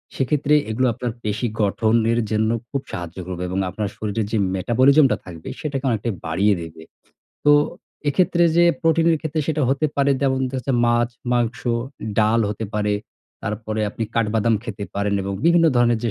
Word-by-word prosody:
সেক্ষেত্রে 145 +2 +1 0.2
এগুলো, 125 +4 +1
আপনার 120 +2 -3
পেশী 110 +3 -1
গঠনের 110 +3 +2
জন্য 110 0 +1 0.2
খুব 140 - -2
সাহায্য 90 0 -6
করবে 90 -1 -4
এবং 95 +1 -2
আপনার 105 +2 -3
শরীরের 110 0 -2
যে 110 - +1 0.2
metabolism 130 - +4
টা - - +1
থাকবে, 85 -3 -9
সেটাকে 140 -3 -3
অনেকটাই 115 -1 -1
বাড়িয়ে 95 +6 +2
দেবে। 80 -1 -9 0.6
তো 145 - +6 0.6
এক্ষেত্রে, 175 +3 +2
যে 175 - +6 0.2
প্রোটিনের 165 0 +3
ক্ষেত্রে 155 0 -2
সেটা 155 -1 0
হতে 140 +3 +2
পারে 140 0 +3
যেমন, 130 -1 +1
দেখা 130 - -5
যাচ্ছে, 135 +1 -2
মাছ, 120 0 +2 0.2
মাংস, 120 -1 0 0.6
ডাল 110 +2 +3
হতে 105 +2 -4
পারে। 105 -1 +1 0.5
তারপরে 110 +1 -3
আপনি 115 - -3
কাঠ 115 -1 +2
বাদাম 115 +1 +2
খেতে 105 -3 -5
পারেন, 100 0 0
এবং 100 +1 -3
বিভিন্ন 170 0 +5
ধরনের 120 -1 +3
যে 115 - +1
115 Hz, 170 wpm, -22 LUFS, 105-135 Hz, 0.6 s, তো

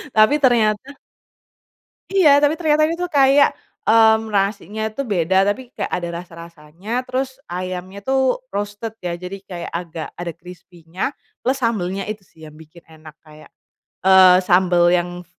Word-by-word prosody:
tapi 215 +5 +5
ternyata 230 -2 +2 1.2
Iya 310 -8 +5
tapi 295 +2 +2
ternyata 310 -1 +2
ini 335 - -3
tuh 355 - -2
kayak, 280 -3 +4 0.3
mmm, 220 -1 +4
nasinya 205 +2 -1
tuh 275 +6 -5
beda 190 -2 +1
tapi 240 +5 -2
kayak - - -4
ada 175 -1 -2
rasa-rasanya 170 +7 -7
terus 260 +1 -3
ayamnya 185 +2 -6
tuh 265 - 0
roasted 205 +2 -5
ya 175 -4 -4
jadi 180 +3 -7
kayak 175 -3 -7
agak 170 -2 -6
ada 175 -1 -4
krispinya, 175 - -7 0.3
plus 260 +2 +1
sambelnya 195 -4 -2
itu 210 -2 -7
sih 165 - -26
yang 150 - -17
bikin 160 +2 -16
enak 155 -1 -14
kayak, 155 -1 -17 0.5
eee, 185 -1 +7
sambel 175 -1 +3
yang, 175 0 -2
195 Hz, 145 wpm, -20 LUFS, 175-245 Hz, 1.2 s, eee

